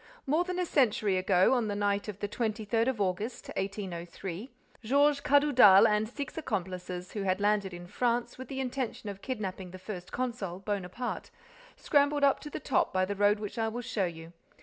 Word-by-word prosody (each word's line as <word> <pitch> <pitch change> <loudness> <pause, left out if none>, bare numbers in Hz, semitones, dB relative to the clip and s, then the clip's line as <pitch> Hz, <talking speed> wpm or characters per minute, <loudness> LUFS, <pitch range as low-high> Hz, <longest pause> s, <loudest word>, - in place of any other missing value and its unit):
More 305 +5 +2
than 365 0 -4
a 365 - +1
century 215 - +2
ago, 185 +3 +4
on 240 -4 +1
the 205 - -2
night 205 0 0
of 210 -3 -5
the 205 - -1
twenty 220 0 -2
third 225 +2 +1
of 260 -4 -1
August, 200 +5 -2
1803, 190 +1 -5 0.3
Georges 280 +4 +3
Cadoudal 255 -9 +7
and 215 0 +1
six 280 +3 -6
accomplices, 180 - -4
who 210 - -4
had 190 0 0
landed 205 -1 +1
in 175 0 -8
France 240 +5 -1
with 260 0 -9
the 265 +1 -5
intention 250 -4 -3
of 200 -1 -7
kidnapping 195 -7 -4
the 185 - -9
first 185 -1 -8
consul, 235 -8 -3
Bonaparte, 200 +4 -4 0.5
scrambled 285 0 +2
up 275 -1 +4
to 300 - -8
the - - -5
top 270 - +1
by 185 0 +2
the 200 +2 -3
road 205 +1 +3
which 210 +2 -5
I 225 - +1
will 240 +2 -4
show 230 -5 -1
you. 165 -1 -7
210 Hz, 195 wpm, -30 LUFS, 190-255 Hz, 0.5 s, Cadoudal